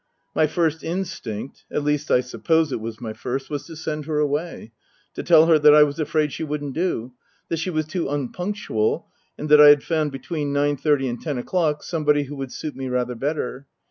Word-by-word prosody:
My 155 - +3
first 160 0 0
instinct 170 - -5
(at 150 - -2
least, 150 0 0
I 125 - +4
suppose 160 +5 0
it 115 - -3
was 110 0 -6
my 110 -3 -5
first) 135 +5 -5
was 145 -2 -4
to 165 - -9
send 155 -1 -4
her 155 -1 -2
away; 150 -4 -2 0.4
to - - -5
tell 160 -2 +6
her 165 -2 +5
that 150 0 +7
I 150 - +8
was 145 +1 -2
afraid 155 -1 0
she - - -4
wouldn't 145 -2 -4
do, 130 -8 -2 0.4
that 165 - -1
she 165 - -2
was 155 -3 -1
too 165 0 -3
unpunctual, 145 - -2 0.3
and 150 - -5
that 150 0 +8
I 150 - +10
had 145 -1 +7
found, 155 -3 0
between 140 +2 -4
nine 145 +1 +1
thirty 145 -2 +1
and 120 -1 -4
ten 150 -5 -3
o'clock, 150 +3 0
somebody 150 -3 +1
who 145 +1 -8
would 135 -2 -5
suit 155 - -6
me 135 -1 -5
rather 125 0 -1
better. 135 0 -3
150 Hz, 210 wpm, -23 LUFS, 135-160 Hz, 0.4 s, I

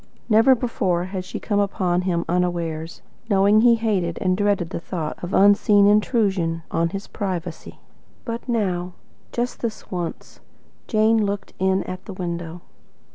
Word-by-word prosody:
Never 225 +4 +6
before 195 -8 -1
had 185 0 -5
she 185 - -6
come 205 -2 -1
upon 185 -3 +1
him 175 -2 -1
unawares, 170 -2 -2 0.3
knowing 200 +1 +4
he 235 0 +6
hated 200 -7 -1
and 185 -1 +1
dreaded 200 -3 0
the - - -3
thought 165 -2 -5
of 175 - -4
an 195 - +4
unseen 205 0 +5
intrusion 200 -6 +2
on 165 0 +1
his 195 +3 -6
privacy. 180 -4 -5 0.5
But 235 +1 -5
now 180 -6 -1 0.4
just 240 +1 -2
this 230 -2 -5
once 175 -3 -5 0.5
Jane 220 0 +3
looked 200 -1 -3
in 190 0 +2
at 185 +1 -7
the 200 - -7
window. 170 -2 -5
190 Hz, 150 wpm, -22 LUFS, 175-210 Hz, 0.5 s, Never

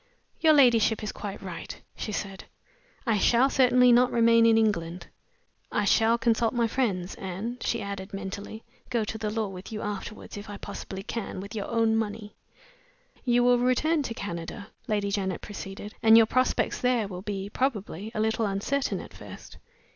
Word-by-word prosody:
"Your 315 -1 +5
ladyship 235 -6 +4
is 210 - -2
quite 200 -1 -7
right," 185 -3 -7 0.2
she 215 - -5
said. 195 -1 -5 0.6
"I 225 -4 +2
shall 245 +6 +4
certainly 250 -1 +5
not 245 +1 +5
remain 230 0 +5
in 225 -1 +5
England. 180 -6 0 0.7
I 210 - +1
shall 225 +3 +4
consult 235 -1 +1
my 235 -1 +2
friends 200 -8 -1
and," 200 +7 -5
she 235 -3 -1
added, 200 -1 -6
mentally, 200 +3 -6 0.3
"go 235 -3 0
to 215 0 -3
law 220 0 -1
with 190 +1 -9
you 215 -1 -4
afterward, 210 +1 -6
if 205 - -10
I 205 - -6
possibly 195 -1 -7
can, 220 -3 -5
with 200 +3 -8
your 210 -3 -4
own 225 -1 +2
money!" 215 -1 -3 0.9
"You 245 -1 +3
will 245 0 +4
return 290 +6 +2
to 230 -5 -4
Canada," 195 +1 -6 0.2
Lady 205 -2 0
Janet 190 -2 -2
proceeded; 205 0 -8
"and 225 0 +7
your 225 - +7
prospects 255 +3 0
there 250 -4 +2
will 180 -2 -7
be, 200 -1 -4
probably, 220 -6 -2
a - - -1
little 220 0 +1
uncertain 205 +8 -1
at - - -12
first. - - -11
220 Hz, 170 wpm, -27 LUFS, 200-235 Hz, 0.9 s, and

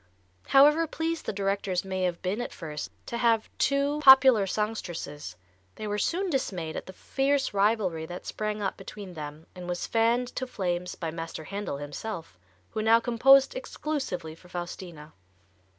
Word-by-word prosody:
However 300 +4 +6
pleased 325 +1 -3
the - - +1
directors 195 -2 -1
may 190 -1 -1
have 175 0 -2
been 195 +6 -1
at 245 - -4
first 150 -4 -6 0.2
to 235 - -4
have 230 -2 +2
two 280 +2 +2
popular 265 -7 +8
songstresses, 175 - -4 0.4
they 215 - -6
were 210 0 -1
soon 370 - 0
dismayed 180 - -2
at - - -5
the 190 - -9
fierce 275 +5 0
rivalry 195 -6 +1
that 175 +2 -8
sprang 215 -1 -3
up 195 - -2
between 195 -1 -9
them 150 0 -8
and 180 -1 -8
was 175 0 -2
fanned 235 +2 +2
to 260 0 -4
flames 180 -6 -2
by 165 -2 -4
Master 165 -1 -6
Handel 200 -4 -4
himself, 145 - -6 0.3
who 215 - -2
now 225 +1 +5
composed 265 - +5
exclusively 295 - -4
for 175 +2 -17
Faustina. 175 -3 -7
200 Hz, 160 wpm, -28 LUFS, 175-250 Hz, 0.4 s, popular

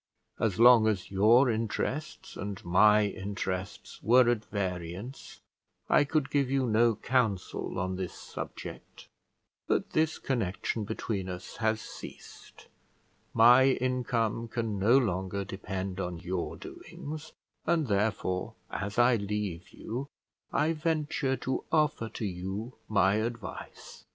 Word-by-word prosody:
As 110 -3 0
long 120 -2 +8
as 100 -4 -1
your 110 +7 +5
interests 120 +6 -2
and 100 -2 -6
my 105 +4 +5
interests 95 -1 -4
were 125 +3 +5
at 110 -3 -1
variance, 95 +4 -5 0.5
I 145 - +5
could 150 -1 0
give 140 -3 +2
you 135 -1 +1
no 115 0 +3
counsel 110 -5 -1
on 95 0 -2
this 95 -2 -4
subject; - - -8 0.6
but - - 0
the 155 +1 +3 0.2
connection 110 -2 -1
between 100 -3 -3
us 90 0 -7
has 110 -1 +1
ceased; - - -11 0.7
my 120 +3 +8
income 120 -3 -1
can 110 -3 -2
no 115 +7 +5
longer 100 -4 -1
depend 95 0 -5
on 90 -2 -3
your 90 +1 -3
doings, 155 +2 -8 0.3
and 165 -2 +2
therefore, 100 -4 -1 0.2
as 100 +2 -4
I 120 0 +5
leave 100 -4 -3
you, 125 +5 -5 0.4
I 155 +3 +2
venture 150 -4 0
to 130 +2 -2
offer 150 -7 +2
to 110 - -5
you 95 +6 -4 0.2
my 100 -1 +3
advice." 115 -1 -6
110 Hz, 125 wpm, -29 LUFS, 95-125 Hz, 0.7 s, long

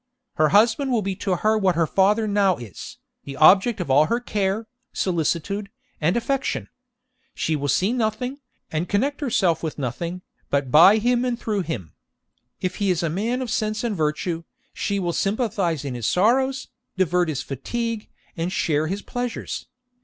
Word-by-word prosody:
Her 155 0 +4
husband 230 - +3
will 230 -4 +1
be 195 0 -2
to 195 -3 0
her 215 +4 +2
what 190 -4 +2
her 165 0 +3
father 205 +6 +2
now 200 -3 +2
is, 115 -6 -9 0.3
the 140 -1 -8
object 195 +8 +6
of 170 -7 -2
all 145 +3 +5
her 235 - +1
care, 210 -2 -1 0.3
solicitude, 185 +3 -1 0.3
and 170 +8 +2
affection. 270 +3 -1 0.7
She 160 - 0
will 145 -1 -2
see 190 - +2
nothing, 250 +3 -2 0.3
and 160 +3 -2
connect 275 +9 0
herself 190 - +1
with 160 -3 -4
nothing, 170 +7 -4 0.3
but 140 -3 0
by 175 - +8
him 240 +2 +2
and 245 -2 -1
through 210 -3 -1
him. 115 - -5 0.7
If 185 0 -2
he 200 -2 0
is 180 -1 +1
a 165 - 0
man 230 +9 -1
of 240 - -5
sense 215 -1 -1
and 230 -3 -1
virtue, 165 +1 -1 0.3
she 200 - -2
will 175 -3 -1
sympathise 195 - -1
in 135 - -3
his 120 -3 -3
sorrows, 260 +7 +2 0.3
divert 180 -2 +2
his 145 -4 -2
fatigue, 230 - -4 0.3
and 170 +1 -2
share 155 -4 0
his 195 +4 -3
pleasures. 245 -1 -4
195 Hz, 170 wpm, -23 LUFS, 165-225 Hz, 0.7 s, by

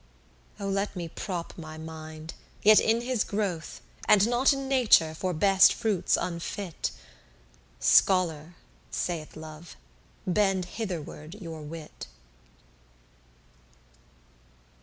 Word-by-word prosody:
Oh 200 - -3
let 195 +1 -1
me 175 -2 -4
prop 175 -1 -5
my 155 -1 -8
mind, 160 0 -8 0.3
yet 215 +1 +8
in 225 +1 +2
his 245 -2 0
growth, 195 -6 -3 0.3
And 210 0 +6
not 245 +3 +4
in 275 -1 -2
Nature, 240 -12 +4
for 185 +3 -2
best 190 +3 +5
fruits 220 -6 +1
unfit: 170 - -4 0.9
"Scholar," 170 - +3 0.3
saith 165 -4 -3
Love, 155 +1 -10 0.5
"bend 190 -1 +2
hitherward 175 -5 -6
your 165 -6 -8
wit." 155 +1 -9
180 Hz, 100 wpm, -28 LUFS, 160-205 Hz, 0.9 s, yet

